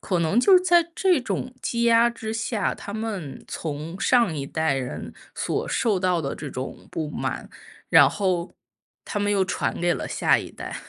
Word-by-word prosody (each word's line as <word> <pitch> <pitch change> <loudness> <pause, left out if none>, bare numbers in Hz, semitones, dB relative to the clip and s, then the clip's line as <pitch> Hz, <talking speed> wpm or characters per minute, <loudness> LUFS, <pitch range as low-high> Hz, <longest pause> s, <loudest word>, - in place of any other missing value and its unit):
可 185 - -1
能 170 +8 +2
就 385 +9 +6
是 360 - +5
在 345 -2 +4
这 365 -6 +3
种 250 0 -3
积 235 0 -1
压 235 0 +5
之 225 -2 -5
下， 220 -2 -1
他 200 - -8
们 210 -10 -5
从 160 +4 -5
上 235 -9 +3
一 140 -2 -4
代 160 -1 0
人 130 -2 -4 0.2
所 - - -2
受 210 -6 +1
到 180 -3 +1
的 135 - -3
这 145 - -7
种 130 0 -7
不 155 -2 -3
满， - - -4 0.4
然 - - +8
后 185 -3 -1 0.5
他 205 - -3
们 205 0 0
又 195 -2 +2
传 185 - -2
给 175 0 +2
了 - - -4
下 - - +3
一 - - -7
代。 - - -7
195 Hz, 205 characters per minute, -24 LUFS, 160-235 Hz, 0.5 s, 然